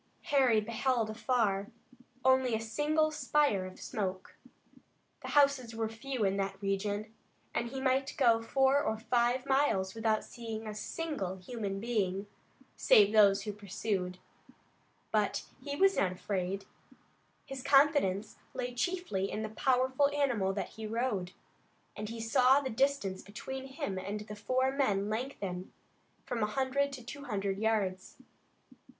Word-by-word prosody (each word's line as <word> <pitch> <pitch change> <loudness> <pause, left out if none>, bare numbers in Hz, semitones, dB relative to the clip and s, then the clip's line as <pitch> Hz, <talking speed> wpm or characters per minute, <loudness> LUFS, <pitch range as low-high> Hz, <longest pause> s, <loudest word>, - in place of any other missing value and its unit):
Harry 255 -6 +5
beheld 230 +1 0
afar 215 -3 0 0.6
only 260 -2 +4
a - - -1
single 300 +8 +1
spire 295 -10 +1
of 185 - -12
smoke. 190 -3 -4 0.9
The - - -7
houses 275 -5 +3
were 225 -1 -1
few 230 0 -3
in 195 0 +1
that 195 0 -2
region, 205 +2 -2 0.4
and 235 - -1
he 265 +2 -5
might 265 +1 +1
go 235 -5 +4
four 270 +4 +3
or 220 -4 -1
five 240 +3 +1
miles 265 -9 +2
without 220 -1 +1
seeing 225 -2 -7
a 215 - -5
single 215 - -4
human 195 0 -4
being, 200 -4 -1 0.5
save 205 0 +5
those 200 -2 +6
who 210 - -4
pursued. 200 -2 -3 0.9
But - - +1 0.2
he 285 -1 -4
was 390 +5 +4
not 185 -2 +2
afraid. 195 +1 -3 0.8
His 270 -1 -6
confidence 275 -8 +3 0.2
lay 250 0 -3
chiefly 250 - -1
in 215 - -3
the 215 - -3
powerful 260 +4 +2
animal 265 -10 +1
that 195 - -3
he 220 -1 -7
rode, 215 -5 -1 0.6
and 210 0 -5
he 230 0 -6
saw 255 +4 +4
the 265 -2 -4
distance 225 -6 0
between 265 +6 -7
him 265 - -4
and 205 +3 -4
the 210 0 -8
four 255 +5 +1
men 210 -8 +1
lengthen 205 -6 -4 0.5
from 240 -2 -3
a 210 - +2
hundred 270 +4 0
to 255 -3 -7
two 285 +3 -8
hundred 200 -5 -2
yards. 205 -4 -1
225 Hz, 145 wpm, -32 LUFS, 200-265 Hz, 0.9 s, those